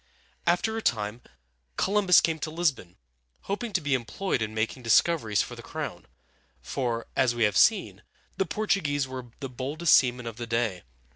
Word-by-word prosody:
After 180 +6 +2
a 225 - -2
time 110 - -1 0.6
Columbus 195 -2 +4
came 160 -1 0
to 155 - -3
Lis´bon, 150 - -1 0.5
hoping 215 +4 -4
to 185 - +1
be 145 -2 0
employed 125 - -1
in 110 -1 -2
making 115 +4 -2
discoveries 115 - +3
for - - -8
the - - -10
crown; - - -6 0.5
for, 115 - -3
as 125 -3 +2
we 120 - +1
have 105 -3 +2
seen, - - +3 0.3
the 190 - -1
Portuguese 165 -9 0
were 130 -1 -7
the 135 - -3
boldest 140 +7 0
seamen 125 -1 +4
of 115 -1 -6
the 120 -1 -5
day. 115 -6 -1
130 Hz, 165 wpm, -27 LUFS, 115-170 Hz, 0.6 s, Columbus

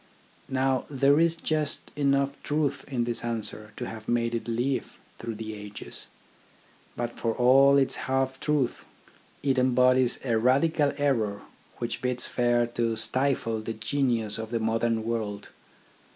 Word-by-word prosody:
Now 130 -1 +1
there 140 +1 +3
is 165 0 +3
just 155 -3 -2
enough 140 -1 +1
truth 150 -1 -1
in 120 -3 0
this 120 -1 -1
answer 110 -2 -4
to - - -4
have 110 -1 -8
made 120 0 +1
it 115 - -3
live 120 +2 -2 0.2
through 115 -1 -5
the 110 0 -6
ages. 105 -1 -7 0.9
But 120 0 -4
for 115 -1 0
all 135 +3 +6
its 135 -1 +2
half 130 0 0
truth, 150 -5 0 0.6
it 135 -2 +2
embodies 125 0 +4
a 115 -3 +2
radical 140 +4 +3
error 115 -8 0 0.3
which - - -4
bids 125 -1 0
fair 120 -1 +2
to 115 -1 -1
stifle 115 -1 +1
the 115 +1 -4
genius 115 -2 0
of 110 0 -5
the 115 0 -1
modern 115 0 0
world. 110 -3 -3
120 Hz, 145 wpm, -27 LUFS, 115-135 Hz, 0.9 s, all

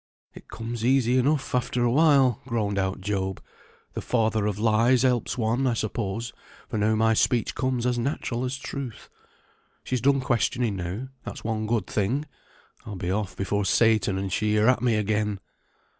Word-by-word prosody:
"It - - -13
comes 115 0 -6
easy 130 0 +3
enough 140 +2 0
after 125 -1 0
a 120 - +2
while," 135 -4 +4
groaned 105 -5 -1
out 95 0 -2
Job. 95 -1 -2 0.5
"The - - -4
father 110 -3 +1
of 105 -2 -2
lies 115 +3 +3
helps 125 -2 +1
one, 120 +3 +1
I 120 - +1
suppose, 115 +1 -3 0.3
for 110 - -3
now 110 +1 +2
my 110 +1 +3
speech 115 +1 +1
comes 130 -2 -1
as 125 -1 +1
natural 125 -1 -2
as 130 +1 -2
truth. 135 -3 -7 0.7
She's 130 -2 -2
done 140 +2 +3
questioning 120 -3 0
now, 95 +8 -5
that's - - -8
one 110 -1 -2
good 110 -4 0
thing. 115 +11 -1 0.6
I'll 105 - -7
be 90 -1 -3
off 100 -1 -2
before 100 +1 -1
Satan 110 -2 +3
and 95 -1 -3
she 105 0 +1
are 110 +3 +4
at 125 -2 +3
me 120 -3 +2
again." 105 -1 0
115 Hz, 175 wpm, -25 LUFS, 105-125 Hz, 0.7 s, while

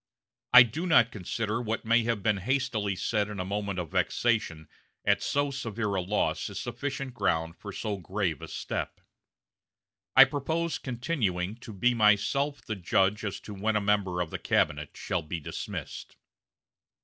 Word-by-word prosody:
I 125 0 +11
do 140 +10 -4
not 120 -8 +5
consider 110 +3 -2
what 115 -1 -3
may 115 +1 +4
have 115 -4 -1
been 105 -1 +2
hastily 110 -3 -1
said 105 +2 0
in 105 -2 -6
a 90 - -2
moment 100 0 -3
of 85 -4 -4
vexation 95 -10 0 0.4
at - - +3
so 145 0 0
severe 115 -5 -3
a 95 - 0
loss 105 +4 -1
is - - -6
sufficient 135 +2 -4
ground 80 -7 0
for 100 - -7
so 105 0 -3
grave 95 -4 -2
a - - -7
step.... - - -4 1.2
I 135 - +11
propose 160 +5 -2
continuing 115 - -2
to 120 -1 -10
be 120 +5 +2
myself 120 +7 +2
the 110 - -4
judge 95 +3 +1
as 105 -3 -3
to 105 - -8
when 105 +2 -1
a - - +4
member 100 -3 +1
of 85 - -3
the - - -4
cabinet 75 -1 0
shall 90 - -2
be 80 +2 -5
dismissed." 75 - -6
105 Hz, 165 wpm, -28 LUFS, 95-120 Hz, 1.2 s, I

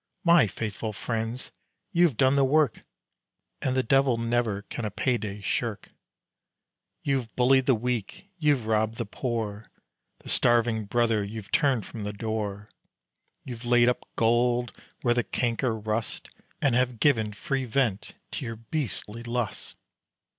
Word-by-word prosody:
"My 170 -7 +6
faithful 110 +2 -4
friends, 115 +3 -3 0.4
you 175 -2 +5
have 145 -10 0
done 130 0 +4
the 140 - +4
work 145 -2 +2 0.8
And 130 - 0
the 130 - +2
devil 135 0 +3
never 115 -3 0
can 120 - -6
a 105 - -1
payday 105 -2 -2
shirk. 110 +1 -2 1.1
"You've 130 -5 -1
bullied 130 +1 +4
the 130 - +5
weak, 120 - -3
you've 145 -7 +2
robbed 110 0 +1
the 115 - -2
poor; 110 -2 -4 0.5
The - - -10
starving 115 -2 +3
brother 115 0 +1
you've 105 0 -7
turned 135 - +2
from 110 - -7
the 105 0 -3
door, 105 -1 -4 0.7
You've 120 -2 -7
laid 120 0 +4
up 125 - -3
gold 120 +1 +2 0.3
where 120 -2 +4
the 120 0 +1
canker 120 0 0
rust, 110 +1 -3 0.3
And 135 -4 +3
have 125 -1 +1
given 110 -7 +3
free 135 +5 -2
vent 115 -5 -1 0.2
to - - -4
your 115 -2 -4
beastly 115 -2 -4
lust. 120 -3 -4
120 Hz, 145 wpm, -27 LUFS, 110-130 Hz, 1.1 s, My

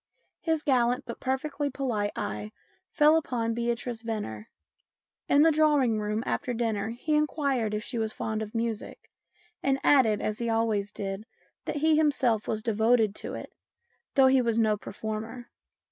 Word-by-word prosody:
His 320 -2 -1
gallant 250 -3 +2
but 235 - -7
perfectly 280 +2 -2
polite 235 -7 -1
eye 105 +1 -4 0.4
fell 305 0 +5
upon 235 -7 -1
Beatrice 235 0 -2
Venner. 210 - -5 0.8
In 285 +1 +6
the 325 - +6
drawing 295 -7 +3
room 210 +2 -2
after 250 -4 -2
dinner 220 -2 -1
he 245 +7 -3
inquired 280 -7 +1
if 210 - -3
she 240 -1 -3
was 220 -1 -1
fond 220 0 -3
of 215 +1 -6
music, 225 -2 -4 0.5
and 270 -1 +2
added, 230 -7 +4
as 215 +2 -2
he 235 -1 -1
always 220 -3 0
did, 195 +2 -5 0.4
that - - -3
he 310 +1 +3
himself 265 -8 +2
was 215 -1 -2
devoted 225 -1 +3
to - - -6
it, - - -8 0.6
though 270 - +6
he 260 0 +5
was 230 -2 0
no 220 -2 +3
performer. 220 +3 -6
235 Hz, 160 wpm, -28 LUFS, 215-270 Hz, 0.8 s, In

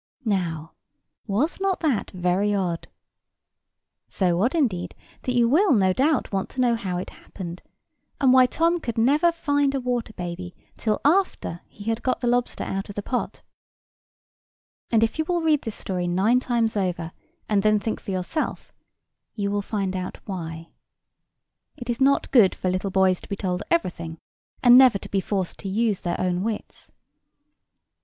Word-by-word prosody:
Now, 170 -6 -2 0.5
was 240 - 0
not 385 -1 0
that 285 - 0
very 185 +3 0
odd? 175 -4 -2 1.2
So 180 -2 0
odd, 245 +9 +1
indeed, 185 - 0 0.3
that 250 - -2
you 240 -1 +4
will, 340 - +4
no 190 -5 +3
doubt, 280 +6 +1
want 195 -1 -2
to 260 - -9
know 245 -2 +3
how 195 -6 -2
it 180 - -5
happened, 175 -2 -9 0.6
and 260 -2 +5
why 255 -1 +7
Tom 335 +6 +1
could 235 -8 -5
never 290 +9 +4
find 285 -4 0
a - - 0
water 245 -3 -2
baby 175 0 -6 0.2
till 215 -2 -1
after 310 - +1
he 205 - -12
had 225 +2 -1
got 255 - 0
the - - -3
lobster 245 0 0
out 195 +1 -4
of 200 - -8
the 205 - -4
pot. 250 - -3 1.5
And, 225 -1 +3
if 225 +7 -1
you 315 - +1
will 345 0 0
read 310 -3 +3
this 225 - -5
story 180 -2 -3
nine 195 +8 +3
times 235 -3 0
over, 180 -4 -2 0.4
and 205 -2 +2
then 215 0 +3
think 220 +2 -3
for - - -10
yourself, 190 - -3 0.6
you 200 -2 -1
will 205 0 0
find 195 -2 -2
out 185 0 -4
why. 165 -4 -6 1.1
It 245 -1 -3
is 240 +3 -5
not 275 +1 +3
good 220 -8 +5
for 185 - -1
little 185 +2 -1
boys 190 -1 +2
to - - -14
be 200 - -2
told 185 -2 -2
everything, 170 - -1 0.5
and 245 0 +9
never 255 -6 +6
to - - -10
be 195 - 0
forced 190 -2 -3
to 195 - -5
use 210 0 +1
their 175 - -3
own 180 -1 0
wits. 215 +1 -5
210 Hz, 175 wpm, -24 LUFS, 185-255 Hz, 1.5 s, and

